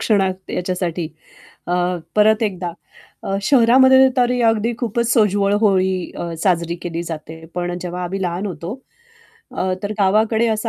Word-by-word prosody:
क्षणात 190 -3 0
याच्यासाठी. 180 -2 -2 0.6
अ, 175 - 0 0.4
परत 215 +1 +4
एकदा 185 -5 -2 0.5
अ, 195 - -2
शहरामध्ये 260 +2 +6
तरी 250 0 +2
अगदी 225 0 +2
खूपच 235 -1 -1
सोज्वळ 205 -3 +2
होळी 190 -4 +1
अ, 170 - -4
साजरी 170 -3 +1
केली 170 -1 -4
जाते, 160 -1 -8
पण 175 0 -2
जेव्हा 180 0 -5
आम्ही 190 +2 -4
लहान 180 +2 -2
होतो, 170 -2 -6 0.8
अ, 185 0 -1
तर 205 +1 -2
गावाकडे 215 +3 +2
असं 220 +1 -1
195 Hz, 140 wpm, -19 LUFS, 175-220 Hz, 0.8 s, शहरामध्ये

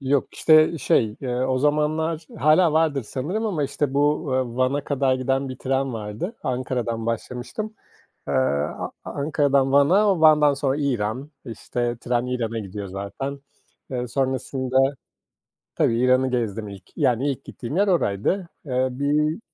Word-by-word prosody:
Yok, 135 0 0
işte, 155 +1 +5
şey, 110 -4 +1
eee, 125 -3 -3
o 130 +1 0
zamanlar 155 +3 0
hâlâ 155 +4 +4
vardır 155 -3 +2
sanırım 155 - -3
ama, 175 -8 -1
işte, 140 0 -2
bu, 145 +1 +1
eee, 130 -2 -1
Van'a 130 +3 +1
kadar 135 -2 +1
giden 135 +1 -1
bir 130 0 -7
tren 135 0 -1
vardı. 110 - -5
Ankara'dan 125 -3 -2
başlamıştım. 125 - -4 0.5
Eee, - - -1
A 70 +3 0
Ankara'dan 140 -2 +1
Van'a, 185 +7 +4
Van'dan 150 -2 +6
sonra 135 -1 0
İran, 130 -1 -2
işte, 120 0 -3
tren 120 0 0
İran'a 115 -3 -2
gidiyor 100 -1 -6
zaten. 100 +9 -5 0.5
Eee, 125 -1 -3
sonrasında 130 0 -1 1.0
tabii, 115 - +2
İran'ı 130 +1 +3
gezdim 110 -4 -2
ilk. 100 -2 -10
Yani 125 +3 +2
ilk 135 0 -5
gittiğim 130 +5 -6
yer 200 +2 +3
oraydı. 175 - 0 0.2
Eee, 130 -1 +1
bir 150 - 0
135 Hz, 140 wpm, -23 LUFS, 120-150 Hz, 1.0 s, Van'dan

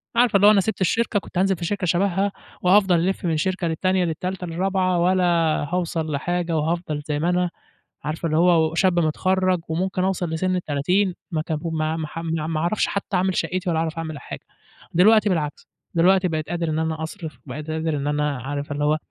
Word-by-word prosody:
عارف 240 -2 +3
إن 200 - +5
لو 205 +1 +8
أنا 205 -2 +5
سِبت 220 +1 -3
الشركة 210 +3 +1
كنت 190 - -9
هانزل 195 +1 +3
في 170 - -4
شركة 195 +1 -1
شبهها، 195 +3 +1 0.3
وهافضل 185 -1 +4
ألِفّ 190 -1 -2
من 160 -2 +1
شركة 185 +1 -1
للتانية، 185 +3 +1
للتالتة، 180 +3 -3
للرابعة، 185 +1 0
ولا 180 +1 +3 0.5
هاوصل 165 -3 -1
لحاجة، 170 +3 -1
وهافضل 155 -1 -1
زي 150 -1 -1
ما 165 +3 +1
أنا، 180 0 +1 0.5
عارفة 155 +2 -3
اللي 155 0 0
هو 165 -2 +4
و - - -7
شاب 180 0 +3
متخرّج، 185 +3 +1
وممكن 185 +3 -1
أوصل 185 -2 -1
لسن 185 +3 0
ال30 180 +4 0 0.2
ما 160 -2 0
ك 160 - -7
بو 155 +2 -3
ما 155 0 -1
ما 160 -1 -3
ح 165 - -7
ما 160 -2 -2
ما 160 -1 -1
أعرفش 175 +6 +1
حتى 200 -1 -2
أعمل 185 0 +1
شقّتي 185 0 -1
ولا 160 -2 +1
أعرف 165 0 -2
أعمل 160 -1 -4
أي - - -8
حاجة. - - -8 0.5
دلوقتي 210 +4 +5
بالعكس، 155 -5 -2 0.3
دلوقتي 185 +2 +4
بقيت 155 -2 -3
قادر 170 -1 -1
إن 155 0 -1
أنا 160 0 -2
أصرف، 160 -4 -7
بقيت 150 +4 -6
قادر 160 -1 -1
إن 140 0 -3
أنا 150 -2 0
عارفة 145 +3 -4
اللي 145 +1 -2
هو 150 +1 +3
170 Hz, 210 wpm, -23 LUFS, 155-185 Hz, 0.5 s, لو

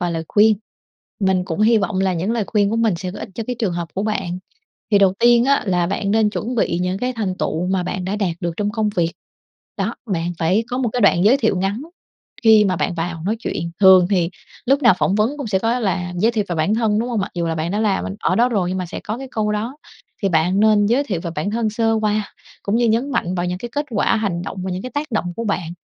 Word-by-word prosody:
vài 175 -1 -1
lời 165 0 -3
khuyên, 215 0 +4 0.6
mình 190 -2 +2
cũng 175 +2 -4
hi 225 +1 +5
vọng 195 -1 -1
là 190 -1 +1
những 180 +6 -1
lời 230 -3 0
khuyên 205 -2 +1
của 225 - 0
mình 225 -4 +2
sẽ 180 +1 -5
có - - -8
ích - - -6
cho 230 - -4
cái 250 -1 -3
trường 205 -6 0
hợp 170 -1 -4
của 195 - -1
bạn. 195 -5 -2 0.5
Thì 200 - +6
đầu 195 -2 +4
tiên 240 0 +5
á, 280 +1 +3
là 175 -2 +1
bạn 200 +1 -2
nên 215 -1 +3
chuẩn 235 +4 -4
bị 195 -6 0
những 185 +1 -1
cái 250 +2 -1
thành 205 -6 -2
tựu 165 +3 -1
mà 185 -1 0
bạn 180 +1 -4
đã 195 +3 -2
đạt 180 -5 -1
được 175 - -1
trong 205 0 -1
công 220 -2 0
việc. 170 -1 +1 0.7
Đó, 205 +5 -1
bạn 175 -3 -2
phải 185 +7 +1
có 250 - -2
một 250 - 0
cái 250 - -1
đoạn 195 -3 +4
giới 245 +6 +6
thiệu 220 -7 +1
ngắn 195 +6 -1 0.6
khi 220 -2 +6
mà 185 -2 +1
bạn 175 - -1
vào 165 -1 -4
nói 220 +3 0
chuyện, 170 -5 -3
thường 185 -2 +7
thì 180 -3 +1 0.4
lúc 275 +3 +3
nào 235 -6 +6
phỏng 190 - +1
vấn 220 +8 +1
cũng 280 - -4
sẽ 195 -3 +1
có 230 +4 0
là 180 -4 -1
giới 220 +6 +2
thiệu 215 -3 0
về 175 - -2
bản 160 +7 +1
thân, 220 -2 +1
đúng 235 - -1
hông? 235 -4 -1
Mặc 195 - -3
dù 170 -1 -1
là 165 - -1
bạn 160 +2 -2
đã 210 - 0
làm 205 -3 +1
bên 195 - -5
ở - - +1
đó 240 +2 +4
rồi 195 -6 0
nhưng 185 - -2
mà 180 - -3
sẽ - - -7
có 215 +3 -5
cái 270 -1 -7
câu 210 -1 0
đó. 225 +6 -3 0.5
Thì 195 - +2
bạn 175 +4 +2
nên 210 -1 +4
giới 255 +6 +2
thiệu 190 -10 -3
về 170 -1 -5
bản 155 +7 -1
thân 225 0 0
sơ 225 +1 +1
qua, 215 -1 -1 0.3
cũng 205 +2 0
như 235 0 +2
nhấn 235 +6 +1
mạnh 185 -6 -1
vào 175 0 -1
những 180 0 -3
cái 240 +5 -6
kết 290 0 -2
quả, 210 0 +1
hành 185 -5 -2
động 195 - -6
và 190 - -3
những 180 +1 -4
cái 255 - -6
tác 290 0 -3
động 215 - 0
của 230 - -3
bạn 180 -5 -2
205 Hz, 280 wpm, -20 LUFS, 180-225 Hz, 0.7 s, thường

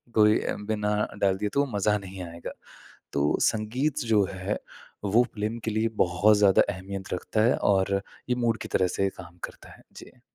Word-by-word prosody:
कोई 105 0 +5
अ, - - -2
बिना 105 -1 0 0.3
डाल 95 -1 +3
दिए, 105 +1 -1
तो 140 0 +3
मज़ा 105 +1 +2
नहीं 95 -1 -9
आएगा। 85 0 -7 0.6
तो 70 +1 +2
संगीत 125 +8 -1
जो 105 -3 +4
है, 95 +2 -3 0.5
वो 110 +5 +4
फ़िल्म 110 +2 -2
के 110 - -1
लिए 110 +1 +1 0.2
बहुत 100 +4 +4
ज़्यादा 100 -2 +6
अहमियत 95 0 -6
रखता 110 +4 -2
है 120 - +4
और 100 0 +2 0.3
ये - - +4
मूड 115 -2 +1
की - - -7
तरह 95 - +3
से 100 0 +3
काम 90 -1 -12
करता - - -9
है। - - -20
जी। 125 - -13
105 Hz, 185 wpm, -27 LUFS, 95-110 Hz, 0.6 s, ज़्यादा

